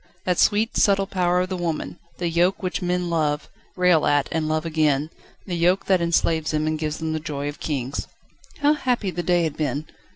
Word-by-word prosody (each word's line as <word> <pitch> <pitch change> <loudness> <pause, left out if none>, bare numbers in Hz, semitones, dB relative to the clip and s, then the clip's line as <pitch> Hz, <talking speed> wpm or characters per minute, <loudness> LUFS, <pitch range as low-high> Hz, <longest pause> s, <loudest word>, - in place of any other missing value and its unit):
that 180 -1 +1
sweet, 215 +3 +3
subtle 195 -1 +3
power 180 -1 +1
of 185 - -2
the 190 - -2
woman: 170 -1 -3 0.2
the 175 - -1
yoke 175 +4 +1
which 185 +1 -2
men 180 0 0
love, 155 -3 0 0.3
rail 180 -4 +4
at, 145 -1 +2
and 160 -1 -1
love 155 +1 0
again, 155 -2 +1 0.3
the 185 - -5
yoke 175 +3 +2
that 185 -2 +3
enslaves 165 -2 +1
them 155 0 0
and 155 0 -1
gives 150 -1 -2
them 160 -1 -3
the 160 - -1
joy 145 -2 -4
of 145 - -6
kings. 135 -3 -3 0.5
How 295 +1 +5
happy 245 -9 -1
the 175 +1 -3
day 175 -1 +2
had 160 -3 -2
been! 150 -1 -2
170 Hz, 205 wpm, -23 LUFS, 155-180 Hz, 0.5 s, How